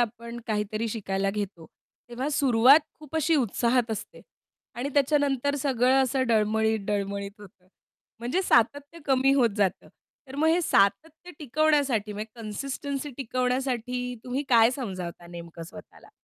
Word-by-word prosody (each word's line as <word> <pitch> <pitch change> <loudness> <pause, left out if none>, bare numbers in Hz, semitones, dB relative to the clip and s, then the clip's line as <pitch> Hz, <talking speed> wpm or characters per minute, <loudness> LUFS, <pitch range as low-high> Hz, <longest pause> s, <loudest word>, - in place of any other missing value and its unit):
आपण 235 0 -3
काहीतरी 215 +1 -2
शिकायला 195 -3 -2
घेतो, 195 -5 -5 0.4
तेव्हा 255 +4 -3
सुरुवात 270 +1 +5 0.2
खूप 305 0 -7
अशी 320 +1 +2
उत्साहात 240 -1 +1
असते 220 - -6 0.5
आणि 250 +4 -3
त्याच्यानंतर 285 -1 +2
सगळं 265 -1 +2
असं 265 +1 0
डळमळीत, 220 0 +2
डळमळीत 200 0 -3
होतं. 190 -2 -16 0.5
म्हणजे 250 +12 -1
सातत्य 285 +4 +1
कमी 270 0 +3
होत 245 -4 +3
जातं. 195 -3 0 0.4
तर 265 - -10
मग 315 +2 +2
हे 340 +2 +3
सातत्य 300 - +1
टिकवण्यासाठी 285 -7 +1
म्हणजे 215 +3 -8
कन्सिस्टन्सी 275 +5 -4
टिकवण्यासाठी 250 -1 -2
तुम्ही 255 +3 -2
काय 230 -1 +6
समजावता 185 - -6
नेमकं 170 -1 -9
स्वतःला? 165 - -13
240 Hz, 130 wpm, -26 LUFS, 210-275 Hz, 0.5 s, काय